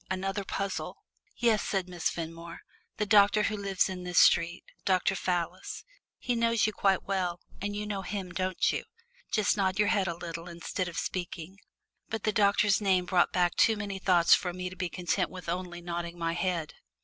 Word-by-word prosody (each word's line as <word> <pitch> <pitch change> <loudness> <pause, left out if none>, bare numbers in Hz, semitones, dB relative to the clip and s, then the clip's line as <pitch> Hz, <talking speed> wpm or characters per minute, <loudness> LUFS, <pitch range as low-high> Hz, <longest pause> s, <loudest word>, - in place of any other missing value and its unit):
Another 195 +1 -2
puzzle! 195 +1 -3 0.4
"Yes," 230 -3 +3
said 190 -2 -1
Miss 175 -2 -1
Fenmore, 165 0 -7 0.4
"the 210 - 0
doctor 205 0 +5
who 215 - 0
lives 200 -2 +1
in 185 -1 -5
this 180 -1 -4
street 170 +1 +5 0.2
Dr. 190 0 +2
Fallis. 185 - -3 0.3
He 245 - -1
knows 230 -1 +2
you 215 - 0
quite 195 -2 +2
well, 180 -3 -1 0.2
and 205 +1 -3
you 210 0 -3
know 205 -2 -3
him, 190 -1 -5
don't 185 0 0
you? - - -3 0.5
Just 215 -2 +2
nod 190 -2 0
your 210 -1 +3
head 195 -3 +2
a 170 -1 -3
little, 170 0 -6
instead 175 +2 -3
of 170 -2 -7
speaking." 180 +1 -4 0.5
But 220 -2 -3
the 215 - +2
doctor's 205 0 +3
name 190 -3 +2
brought 180 -1 +3
back 175 -2 +2
too 225 - +4
many 200 -2 -4
thoughts 175 -3 +5
for 180 -3 +2
me 180 0 -5
to - - -9
be 185 -1 -3
content 180 +1 -1
with 185 -2 -10
only 175 0 -4
nodding 170 0 -4
my 165 -1 -1
head. 170 -3 -2
185 Hz, 190 wpm, -29 LUFS, 175-200 Hz, 0.5 s, doctor